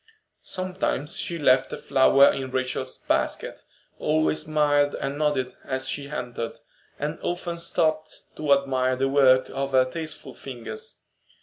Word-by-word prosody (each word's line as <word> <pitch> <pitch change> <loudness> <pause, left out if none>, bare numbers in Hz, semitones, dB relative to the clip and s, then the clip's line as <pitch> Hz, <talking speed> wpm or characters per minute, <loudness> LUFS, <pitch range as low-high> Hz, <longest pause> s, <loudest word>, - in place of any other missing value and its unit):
Sometimes 185 -6 -2
she 170 - -3
left 130 -4 +3
a - - -4
flower 135 0 +5
in 135 -1 -4
Rachel's 130 0 -2
basket, - - -1 0.4
always 155 +1 +1
smiled 145 -2 +2
and 135 +1 -3
nodded 145 -4 0
as 130 0 -2
she 140 -1 -4
entered, 120 -4 -5 0.4
and 150 +3 -3
often 175 -1 -3
stopped 155 -2 -1
to 150 -2 -2
admire 130 -2 +3
the 135 +1 +1
work 130 -2 +5
of 135 0 -3
her 130 -1 +5
tasteful 160 +4 -7
fingers. 135 - -8
140 Hz, 135 wpm, -25 LUFS, 130-155 Hz, 0.4 s, flower